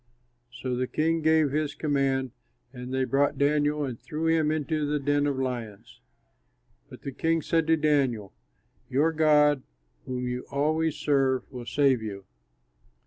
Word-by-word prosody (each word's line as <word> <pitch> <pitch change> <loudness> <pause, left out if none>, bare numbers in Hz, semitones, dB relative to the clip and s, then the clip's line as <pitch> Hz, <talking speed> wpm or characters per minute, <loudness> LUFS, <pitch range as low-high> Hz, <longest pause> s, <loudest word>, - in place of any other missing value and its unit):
So 125 0 -4
the 130 +1 -1
king 165 +3 0
gave 160 -2 +3
his 150 0 -1
command, 135 -3 0 0.4
and 125 +1 -8
they 130 0 0
brought 140 +2 +1
Daniel 145 +1 +1
and 125 -4 -6
threw 155 +1 -4
him 160 -2 +2
into 155 0 -1
the 150 +1 0
den 145 0 +1
of 140 -2 -1
lions. 120 -6 -5 0.9
But - - -13
the 140 - -4
king 165 +3 0
said 165 -1 +1
to 160 0 +4
Daniel, 135 - +1 0.6
"Your 150 +5 +2
God, 150 -3 +4 0.5
whom 125 -1 -3
you 125 0 -4
always 155 +2 0
serve, 135 -3 +1
will 125 -2 -8
save 135 -2 +2
you." 100 -3 -7
145 Hz, 150 wpm, -27 LUFS, 130-155 Hz, 0.9 s, to